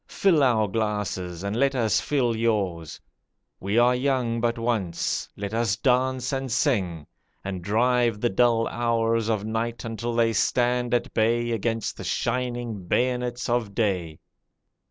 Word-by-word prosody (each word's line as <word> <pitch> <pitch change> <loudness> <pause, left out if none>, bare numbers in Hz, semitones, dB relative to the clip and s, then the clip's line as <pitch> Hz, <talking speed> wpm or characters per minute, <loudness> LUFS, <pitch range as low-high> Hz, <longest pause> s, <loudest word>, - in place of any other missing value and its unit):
Fill 175 -6 +2
our 115 -5 +3
glasses 100 -4 -3
and 100 +1 -2
let 135 +3 +2
us 115 -4 +2
fill 125 -5 0
yours. 100 -8 -1 0.6
We 100 +4 -1
are 120 +1 +5
young 125 -3 0
but 120 0 0
once; 115 -7 -1
let 100 +1 -5
us 115 -3 +1
dance 130 0 +1
and 135 -2 -3
sing, 100 - 0 0.4
And 95 -2 -4
drive 120 +2 +2
the 120 - +1
dull 115 +2 +3
hours 115 -1 0
of 105 -2 0
night 115 +2 -3
until 115 +1 -3
they 115 -1 +2
stand 125 +1 +1
at 120 - -2
bay 120 +2 +1
Against 115 0 -2
the - - -7
shining 120 0 -2
bayonets 125 +2 0
of 120 -4 -1
day. 90 -8 -1
115 Hz, 145 wpm, -25 LUFS, 105-125 Hz, 0.6 s, are